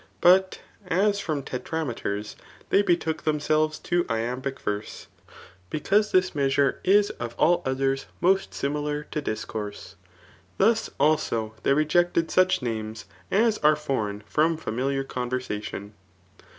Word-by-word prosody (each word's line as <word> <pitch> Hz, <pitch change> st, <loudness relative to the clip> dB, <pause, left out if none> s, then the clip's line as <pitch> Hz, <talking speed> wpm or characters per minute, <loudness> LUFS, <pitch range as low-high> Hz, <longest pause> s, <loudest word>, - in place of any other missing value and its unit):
But 185 Hz, +1 st, +4 dB, 0.3 s
as 200 Hz, +4 st, +2 dB
from 155 Hz, -7 st, -2 dB
tetra 160 Hz, +6 st, -3 dB
meters 105 Hz, -4 st, -4 dB, 0.4 s
they 200 Hz, -, +5 dB
betook 170 Hz, -4 st, 0 dB
themselves 155 Hz, 0 st, +1 dB
to 175 Hz, 0 st, +1 dB
iambic 125 Hz, +4 st, -2 dB
verse, 105 Hz, 0 st, -4 dB, 0.6 s
because 205 Hz, +7 st, +1 dB
this 185 Hz, 0 st, +3 dB
measure 140 Hz, -2 st, +1 dB
is 205 Hz, +2 st, +4 dB
of 120 Hz, -1 st, -5 dB
all 175 Hz, +2 st, +3 dB
others 135 Hz, +1 st, 0 dB
most 190 Hz, +2 st, +2 dB
similar 150 Hz, +1 st, -2 dB
to 150 Hz, -, -2 dB
discourse; 110 Hz, -, -5 dB, 0.6 s
thus, 225 Hz, +3 st, +3 dB
also, 115 Hz, -7 st, +1 dB
they 140 Hz, -, +3 dB
rejected 165 Hz, +2 st, +2 dB
such 185 Hz, -7 st, +3 dB
names 110 Hz, -2 st, -4 dB, 0.2 s
as 220 Hz, +2 st, +2 dB
are 150 Hz, 0 st, +5 dB
fbrdgn 110 Hz, -9 st, -3 dB
from 160 Hz, +8 st, +1 dB
familiar 135 Hz, 0 st, -2 dB
coni^ersation. 125 Hz, -6 st, -4 dB
150 Hz, 125 wpm, -26 LUFS, 125-175 Hz, 0.6 s, they